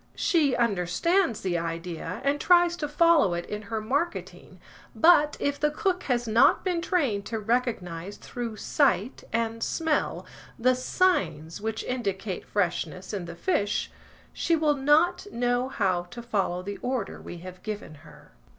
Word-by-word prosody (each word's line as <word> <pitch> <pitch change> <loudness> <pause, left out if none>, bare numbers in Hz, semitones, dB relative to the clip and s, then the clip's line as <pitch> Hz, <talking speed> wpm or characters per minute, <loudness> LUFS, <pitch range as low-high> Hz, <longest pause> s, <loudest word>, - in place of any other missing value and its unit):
She 300 -8 +2
understands 235 - +1
the 175 -2 0
idea, 165 +3 -5
and 285 +1 +1
tries 350 -1 +5
to 295 - -2
follow 300 - +4
it 175 - -4
in 210 0 -5
her 215 +1 -4
marketing, 285 +11 -3 0.4
but, 300 -3 +5
if 285 0 -1
the 300 - +2
cook 370 +3 -1
has 240 -2 0
not 225 +2 +4
been 355 -2 0
trained 270 - 0
to 225 - -3
recognise 205 -6 -2
through 235 -3 -6
sight 255 - +1
and 230 0 -1
smell 320 +3 -1 0.3
the 255 +1 +3
signs 195 - 0
which 220 0 -3
indicate 200 -6 -3
freshness 180 -1 -2
in 190 -4 -3
the 170 0 -8
fish, 205 - 0 0.4
she 335 - +1
will 305 -2 +2
not 305 +7 +3
know 245 +1 0
how 185 -7 0
to 240 -1 -8
follow 195 -6 -1
the 200 +1 -5
order 250 -1 -3
we 175 - -8
have 185 +1 -10
given 210 -7 -6
her. 150 -2 -16
230 Hz, 150 wpm, -27 LUFS, 185-295 Hz, 0.4 s, tries